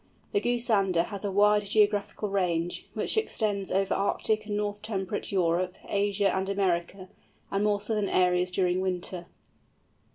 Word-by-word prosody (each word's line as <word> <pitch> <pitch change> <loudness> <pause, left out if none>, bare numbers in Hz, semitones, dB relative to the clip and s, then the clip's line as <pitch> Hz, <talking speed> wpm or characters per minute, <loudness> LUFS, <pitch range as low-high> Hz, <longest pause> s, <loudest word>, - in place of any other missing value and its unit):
The 410 - +1
Goosander 210 -8 +2
has 200 0 -7
a 200 - -2
wide 210 +1 +4
geographical 210 0 +1
range, 175 -3 -1
which - - 0
extends 210 - 0
over 195 0 +1
Arctic 215 +2 0
and 205 -1 -2
North 205 0 -3
temperate 205 -2 -3
Europe, 180 -1 +1
Asia, 200 -1 +1
and 190 +1 -1
America, 185 -1 -1 0.4
and 195 +1 0
more 210 -1 +2
southern 210 -1 -1
areas 180 0 +2
during 180 0 0
winter. 180 -1 -3
200 Hz, 140 wpm, -28 LUFS, 185-210 Hz, 0.4 s, wide